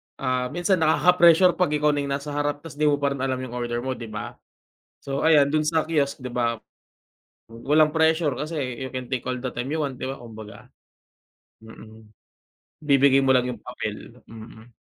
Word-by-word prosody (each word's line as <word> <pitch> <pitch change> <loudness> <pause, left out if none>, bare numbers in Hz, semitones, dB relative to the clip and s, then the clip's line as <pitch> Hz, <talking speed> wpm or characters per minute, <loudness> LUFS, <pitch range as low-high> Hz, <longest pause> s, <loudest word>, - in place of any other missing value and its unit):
ah, 130 -1 -1
minsan 175 +4 0
nakaka-pressure 170 +2 +4
kapag 150 -4 +2
ikaw 150 0 +2
na 145 - -1
iyong 140 -1 -2
nasa 145 +1 -6
harap, 145 +1 -2
tapos 150 -2 -11
hindi 150 - +3
mo 145 - +4
pa 140 0 -1
rin 140 - -4
alam 130 0 -1
iyong 130 -1 -6
order 120 0 -3
mo, 130 - -2
hindi 115 -3 -6
ba? 105 0 -7 0.6
So, 140 0 -4
ayan 150 -3 +5
doon 155 +2 +1
sa 155 0 0
kiosk, 145 -4 0
hindi 125 -2 -8
ba? 115 -2 0 0.9
Wa 115 - -13 0.2
walang 155 0 +4
pressure 160 -3 +2
kasi 155 +2 -4 0.2
you 130 +1 -7
can 130 -1 -6
take 130 -3 -3
all 125 -1 -3
the 130 - -3
time 125 +4 -5
you 160 - -1
want, 140 -3 -3
di - - -6
ba, 135 0 -5
kumbaga, 110 -3 -12 1.0
mm, 110 -1 -14 0.7
ibibigay 135 -1 +4
mo 130 - +4
lang 125 0 +2
yung - - -5
papel, - - -7
mm. 110 +1 -13
140 Hz, 200 wpm, -24 LUFS, 125-150 Hz, 1.0 s, ayan